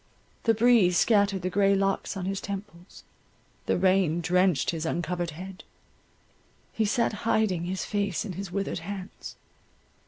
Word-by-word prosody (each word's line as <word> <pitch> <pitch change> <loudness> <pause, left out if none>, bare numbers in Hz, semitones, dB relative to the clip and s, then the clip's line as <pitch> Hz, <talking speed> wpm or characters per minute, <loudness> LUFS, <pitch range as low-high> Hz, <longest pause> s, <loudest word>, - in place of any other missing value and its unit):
The 225 -1 +4
breeze 220 -6 +4
scattered 200 -4 +3
the 185 - -1
grey 200 +1 +3
locks 195 +1 -1
on 185 - -4
his 195 0 -2
temples, 195 -2 -8 0.6
the - - +2
rain 185 -3 +2
drenched 180 -2 +2
his 165 -2 -4
uncovered 175 +1 -2
head, 185 +4 -9 1.1
he 220 - +1
sat 235 +2 +1
hiding 215 -6 +1
his 185 +1 -3
face 200 -3 -1
in 195 - -5
his 190 +1 -6
withered 195 0 -2
hands. 190 +3 -8
190 Hz, 145 wpm, -27 LUFS, 180-200 Hz, 1.1 s, The